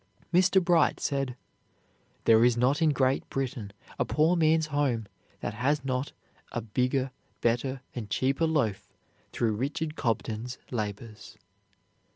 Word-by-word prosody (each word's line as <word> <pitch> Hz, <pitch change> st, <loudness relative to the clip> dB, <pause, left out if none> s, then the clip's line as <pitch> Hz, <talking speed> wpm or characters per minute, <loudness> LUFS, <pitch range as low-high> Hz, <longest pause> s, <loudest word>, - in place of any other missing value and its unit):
Mr. 185 Hz, +2 st, +5 dB
Bright 175 Hz, -2 st, +3 dB
said: 135 Hz, -3 st, -1 dB, 0.9 s
"There 115 Hz, 0 st, +6 dB
is 120 Hz, -1 st, +4 dB
not 130 Hz, +6 st, +2 dB
in 160 Hz, -, +5 dB
Great 135 Hz, -2 st, +1 dB
Britain 125 Hz, -6 st, -3 dB, 0.3 s
a -, -, +4 dB
poor 160 Hz, +4 st, +2 dB
man's 160 Hz, -1 st, +3 dB
home 130 Hz, -6 st, +1 dB, 0.4 s
that 100 Hz, -, -3 dB
has 135 Hz, +5 st, 0 dB
not 130 Hz, +1 st, -1 dB, 0.4 s
a -, -, -2 dB
bigger, 125 Hz, +4 st, 0 dB, 0.3 s
better, 125 Hz, +3 st, 0 dB
and 110 Hz, -4 st, -6 dB
cheaper 135 Hz, +8 st, +1 dB
loaf 130 Hz, -11 st, 0 dB, 0.4 s
through 115 Hz, -2 st, 0 dB
Richard 150 Hz, +7 st, -2 dB
Cobden's 115 Hz, -1 st, -2 dB
labors." 110 Hz, -1 st, -5 dB
130 Hz, 130 wpm, -28 LUFS, 115-150 Hz, 0.9 s, There